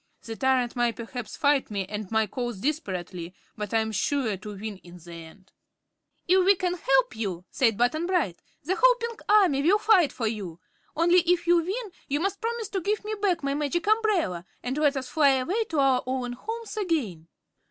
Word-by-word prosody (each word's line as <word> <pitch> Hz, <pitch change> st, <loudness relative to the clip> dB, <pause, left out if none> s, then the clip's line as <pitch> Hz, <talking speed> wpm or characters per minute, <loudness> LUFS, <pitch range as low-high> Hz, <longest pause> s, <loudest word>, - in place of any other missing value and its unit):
The 225 Hz, -, -6 dB
tyrant 255 Hz, -1 st, +1 dB
will 240 Hz, -1 st, +2 dB
perhaps 230 Hz, 0 st, -7 dB
fight 285 Hz, -2 st, +2 dB
me 200 Hz, -2 st, -2 dB
and 210 Hz, 0 st, -6 dB
my 220 Hz, 0 st, +2 dB
cause 240 Hz, 0 st, -4 dB
desperately, 185 Hz, -, -4 dB, 0.2 s
but 210 Hz, -2 st, -5 dB
I 225 Hz, -, +3 dB
am 220 Hz, 0 st, -3 dB
sure 225 Hz, +1 st, 0 dB
to 205 Hz, +2 st, -8 dB
win 210 Hz, 0 st, -6 dB
in 180 Hz, -1 st, -14 dB
the 175 Hz, 0 st, -13 dB
end." 165 Hz, +3 st, -13 dB, 0.8 s
"If 370 Hz, +1 st, +5 dB
we 395 Hz, +2 st, +5 dB
can 360 Hz, -1 st, -1 dB
help 270 Hz, -9 st, +1 dB
you," 190 Hz, -5 st, -4 dB
said 225 Hz, -5 st, +2 dB
Button 310 Hz, +8 st, +1 dB
Bright, 325 Hz, -, 0 dB, 0.2 s
"the 375 Hz, -, 0 dB
whole -, -, +7 dB
Pink 465 Hz, -2 st, -6 dB
Army 380 Hz, -10 st, +5 dB
will 355 Hz, +8 st, +4 dB
fight 400 Hz, -8 st, +4 dB
for 230 Hz, -, -4 dB
you. 200 Hz, -7 st, -4 dB, 0.4 s
Only, 345 Hz, +3 st, +5 dB
if 350 Hz, 0 st, +1 dB
you 345 Hz, 0 st, +5 dB
win, 390 Hz, +6 st, -2 dB, 0.2 s
you 290 Hz, +1 st, 0 dB
must 390 Hz, +3 st, -2 dB
promise 460 Hz, -2 st, -3 dB
to 385 Hz, -, -2 dB
give 415 Hz, +3 st, -1 dB
me 430 Hz, -, -3 dB
back 360 Hz, -6 st, +1 dB
my 275 Hz, 0 st, 0 dB
Magic 300 Hz, +4 st, -1 dB
Umbrella 415 Hz, -, +1 dB, 0.2 s
and 250 Hz, +2 st, -2 dB
let 295 Hz, -2 st, +2 dB
us 260 Hz, -1 st, -4 dB
fly 285 Hz, -3 st, +4 dB
away 370 Hz, -, 0 dB
to 325 Hz, -7 st, -4 dB
our 270 Hz, -2 st, +3 dB
own 255 Hz, -1 st, -2 dB
homes 450 Hz, -, -6 dB
again." 265 Hz, -, -2 dB
275 Hz, 200 wpm, -26 LUFS, 220-360 Hz, 0.8 s, whole